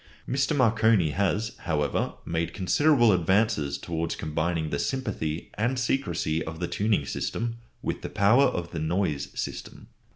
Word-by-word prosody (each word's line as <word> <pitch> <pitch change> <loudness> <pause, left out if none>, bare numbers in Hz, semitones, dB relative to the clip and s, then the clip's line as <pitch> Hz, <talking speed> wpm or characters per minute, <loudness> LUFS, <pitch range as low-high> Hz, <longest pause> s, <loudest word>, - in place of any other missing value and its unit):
Mr. 135 +4 +1
Marconi 110 - +4
has, 105 - 0
however, 75 -3 -1
made 85 0 -2
considerable 120 +5 +4
advances 90 -5 +2
towards 85 -1 -3
combining 80 +1 -2
the 70 - -1
sympathy 85 - -3
and 120 +4 +1
secrecy 125 - 0
of 80 0 -7
the 90 - -1
tuning 105 -8 +1
system 115 +10 -3 0.3
with - - -2
the - - -5
power 115 +8 +4
of 90 -10 -2
the 85 - -4
"noise" 80 -2 -1
system. - - -6
95 Hz, 140 wpm, -27 LUFS, 80-115 Hz, 0.3 s, Marconi